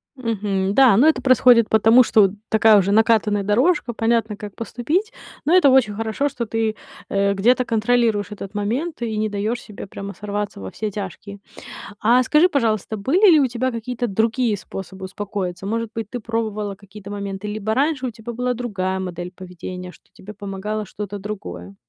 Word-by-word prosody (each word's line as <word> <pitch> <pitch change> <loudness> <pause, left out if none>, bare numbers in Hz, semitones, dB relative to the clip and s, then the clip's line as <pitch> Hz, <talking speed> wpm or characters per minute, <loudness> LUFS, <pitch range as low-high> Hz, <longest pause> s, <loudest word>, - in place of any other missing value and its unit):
Мгм, 205 -5 -2
да, 260 -5 +6
но 270 +7 +5
это 315 - +3
происходит 250 -3 +5
потому, 225 +3 +6
что 210 -4 +4 0.2
такая 220 -1 +5
уже 195 0 +2
накатанная 215 -1 +3
дорожка, 245 - +1
понятно, 225 -1 0
как 205 -2 -9
поступить. 295 - -2 0.3
Но 320 +5 +3
это 360 -7 +6
очень 250 -6 +3
хорошо, 225 +6 -1
что 245 -4 -4
ты, 220 0 -1 0.3
э, 200 0 +1
где-то 245 +6 +2
контролируешь 225 -2 +1
этот 195 -1 -8
момент 240 +10 -2
и 225 -2 -2
не 215 0 0
даёшь 210 +4 -2
себе 210 -4 -10
прямо 200 +1 -7
сорваться 205 0 -4
во 95 - -6
все 215 - -4
тяжкие. 200 0 -7 0.6
А 235 +3 +4
скажи, 300 +7 +4
пожалуйста, 225 - 0
были 345 - +4
ли 315 -3 +6
у 275 - +3
тебя 250 +1 -2
какие-то 245 +1 -3
другие 225 +2 0
способы 190 0 -8
успокоиться? 190 -2 -5
Может 230 +1 -2
быть, 225 -2 -4
ты 245 - -5
пробовала 215 -3 -3
какие-то 200 0 -12
моменты, 200 0 -5
либо 215 +1 -2
раньше 275 -1 0
у - - -2
тебя 230 +1 -8
была 250 +1 -1
другая 190 -6 -3
модель 180 -1 -6
поведения, 180 0 -8
что - - -21
тебе 210 - -11
помогало 205 +1 -5
что-то 205 +1 -6
другое? 100 - -7
215 Hz, 175 wpm, -21 LUFS, 200-240 Hz, 0.6 s, да